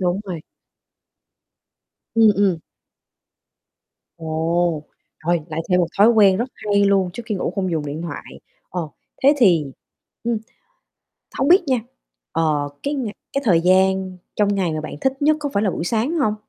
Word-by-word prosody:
Đúng 180 Hz, +1 st, 0 dB
rồi. 175 Hz, -4 st, -5 dB, 1.7 s
Ừm, 225 Hz, -1 st, +6 dB
ừm. 195 Hz, -3 st, +3 dB, 1.6 s
Ồ, 165 Hz, 0 st, -1 dB, 0.4 s
rồi 175 Hz, -1 st, +2 dB
lại 160 Hz, 0 st, -3 dB
thêm 180 Hz, -1 st, +3 dB
một 175 Hz, -, +2 dB
thói 205 Hz, +3 st, +7 dB
quen 205 Hz, -5 st, +5 dB
rất 240 Hz, +6 st, -2 dB
hay 200 Hz, -1 st, +1 dB
luôn 195 Hz, -2 st, +2 dB
trước 240 Hz, -, -7 dB
khi 220 Hz, -, -2 dB
ngủ 190 Hz, -, -2 dB
không 190 Hz, -2 st, -1 dB
dùng 155 Hz, -3 st, -2 dB
điện 150 Hz, +3 st, -5 dB
thoại, 165 Hz, -4 st, -8 dB, 0.3 s
ờ, 175 Hz, -3 st, -3 dB, 0.3 s
thế 280 Hz, +3 st, +6 dB
thì, 180 Hz, -, +5 dB, 0.6 s
ừm 235 Hz, 0 st, 0 dB, 1.0 s
hông 270 Hz, -, +2 dB
biết 370 Hz, +3 st, +7 dB
nha, 260 Hz, -2 st, +2 dB, 0.5 s
ờ, 150 Hz, -3 st, +1 dB
cái 285 Hz, +1 st, -1 dB
ngày 240 Hz, -7 st, -3 dB, 0.2 s
cái 275 Hz, -, -1 dB
thời 180 Hz, -8 st, +4 dB
gian 190 Hz, +1 st, +2 dB, 0.2 s
trong 205 Hz, -1 st, +2 dB
ngày 185 Hz, -4 st, 0 dB
mà 155 Hz, -, -2 dB
bạn 155 Hz, -, -7 dB
thích 265 Hz, +1 st, -1 dB
nhất 305 Hz, +1 st, +4 dB
có 290 Hz, -, -2 dB
phải 200 Hz, -, +1 dB
là 205 Hz, -, +2 dB
buổi 165 Hz, -, -4 dB
sáng 230 Hz, -, 0 dB
hông? 215 Hz, -8 st, +1 dB
190 Hz, 165 wpm, -21 LUFS, 170-225 Hz, 1.7 s, thói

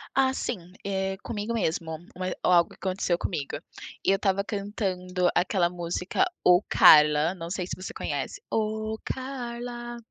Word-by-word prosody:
Ah, 265 Hz, -1 st, +4 dB
sim. 180 Hz, -9 st, -4 dB
Eh, 190 Hz, -1 st, -1 dB
comigo 220 Hz, +1 st, -3 dB
mesmo 160 Hz, -6 st, -1 dB, 0.2 s
ma 185 Hz, 0 st, -2 dB, 0.2 s
ou -, -, +3 dB
algo 170 Hz, -1 st, +4 dB
aconteceu 185 Hz, -2 st, -1 dB
comigo. 155 Hz, -8 st, -3 dB, 0.5 s
Eu 195 Hz, -, +4 dB
estava 195 Hz, 0 st, +1 dB
cantando 185 Hz, -3 st, -1 dB
aquela 175 Hz, -1 st, +2 dB
música: 180 Hz, -, -1 dB, 0.2 s
Ô, 180 Hz, +1 st, +7 dB
Carla, 150 Hz, +3 st, +7 dB
não 165 Hz, -1 st, -7 dB
sei 180 Hz, -1 st, -3 dB
se -, -, -4 dB
você 185 Hz, -, -7 dB
conhece 400 Hz, -, -4 dB
Ô, 220 Hz, 0 st, -1 dB
Carla. 240 Hz, -2 st, -5 dB
190 Hz, 140 wpm, -27 LUFS, 175-220 Hz, 0.5 s, Ô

